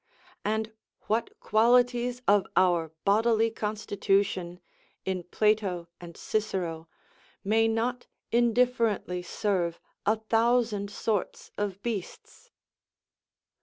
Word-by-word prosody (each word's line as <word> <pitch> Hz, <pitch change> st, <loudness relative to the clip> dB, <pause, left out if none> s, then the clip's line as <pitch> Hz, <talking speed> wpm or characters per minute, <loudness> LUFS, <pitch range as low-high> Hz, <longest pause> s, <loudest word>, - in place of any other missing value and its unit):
And 220 Hz, +1 st, -1 dB, 0.3 s
what 225 Hz, +2 st, -2 dB
qualities 245 Hz, +2 st, +2 dB
of 205 Hz, -1 st, +4 dB
our 175 Hz, -4 st, +3 dB
bodily 225 Hz, +2 st, +3 dB
constitution, 200 Hz, -4 st, -1 dB, 0.5 s
in 190 Hz, -1 st, -1 dB
Plato 185 Hz, -2 st, 0 dB
and 170 Hz, -1 st, -11 dB
Cicero, 175 Hz, -6 st, -2 dB, 0.5 s
may 225 Hz, +3 st, +3 dB
not 235 Hz, +2 st, -1 dB, 0.2 s
indifferently 235 Hz, -5 st, +2 dB
serve 180 Hz, -2 st, -1 dB, 0.3 s
a 215 Hz, -, +5 dB
thousand 225 Hz, -1 st, +1 dB
sorts 205 Hz, -1 st, -3 dB
of 200 Hz, -1 st, -3 dB
beasts? 220 Hz, -6 st, -6 dB
215 Hz, 90 wpm, -28 LUFS, 185-225 Hz, 0.5 s, a